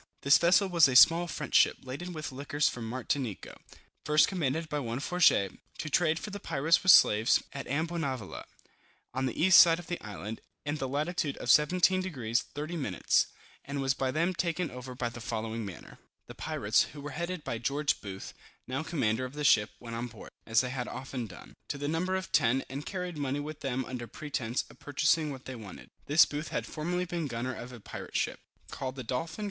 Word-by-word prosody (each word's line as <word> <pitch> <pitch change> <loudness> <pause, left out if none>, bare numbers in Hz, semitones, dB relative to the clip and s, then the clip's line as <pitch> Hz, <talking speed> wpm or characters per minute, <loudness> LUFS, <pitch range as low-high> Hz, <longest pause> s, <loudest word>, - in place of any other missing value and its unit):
This 140 +1 +6
vessel 185 +3 +4
was 170 -5 +5
a 130 - -1
small 165 +6 +7
French 150 -4 -6
ship, - - +5
laden 140 +8 -6
with 155 -4 -5
liquors 145 +2 0
from 115 -2 -4
Martinico, 125 -2 -3 0.5
first 150 0 +4
commanded 160 -3 -1
by 150 -1 -2
one 120 -2 -3
Fourgette, 145 - +3 0.3
to 155 - -5
trade 160 +1 +2
with 210 - -8
the 205 - -5
pirates 165 -2 +2
for 185 - -3
slaves, 110 - +6
at 140 - -6
Ambonavoula, 145 - -3 0.7
on 130 +1 0
the 125 - -5
east 185 +2 +8
side 165 -1 +5
of 175 - -9
the 175 - -4
island, 105 +1 -7 0.2
in 145 +1 -2
the 135 - -3
latitude 150 +2 -1
of 120 - +1
17 180 +6 +4
deg. 130 -12 -5
30 150 +7 -4
min. 105 - -4 0.6
and 140 0 -4
was 135 -1 +1
by 135 -1 -1
them 170 +7 +1
taken 170 0 -1
after 125 0 -8
the 120 -1 -4
following 115 0 -3
manner. 95 -4 -9 0.3
The - - -10
pirates, - - +1
who 145 - -9
were 145 +1 -6
headed 170 +3 -4
by 115 - -3
George 140 +5 0
Booth, 95 -2 -7 0.3
now 130 +3 -3
commander 130 -8 0
of 130 +1 -5
the 150 0 -4
ship, 105 -6 +5
went 115 -1 -7
on 120 +1 -3
board, 120 - -12 0.2
(as 115 0 +4
they 125 -1 -3
had 125 -2 -3
often 130 -3 -5
done,) 95 - -13
to - - -4
the 145 0 -3
number 175 +5 0
of 190 0 -4
ten, 130 -1 +3
and 140 +2 -6
carried 180 -4 -4
money 140 0 -1
with 150 +1 -6
them 130 -1 -2
under 120 -2 -6
pretence 130 -5 -3
of - - -18
purchasing 150 +2 +1
what 130 -2 -9
they 130 - -6
wanted. 105 -5 -11 0.2
This 155 +3 +7
Booth 150 +1 -5
had 115 - -3
formerly 175 +8 -2
been 170 -3 -3
gunner 125 +1 -3
of 120 0 -8
a 125 - -10
pirate - - -6
ship, - - -1 0.3
called 130 0 -4
the 130 - -6
Dolphin. 130 - -3
140 Hz, 205 wpm, -30 LUFS, 125-165 Hz, 0.7 s, east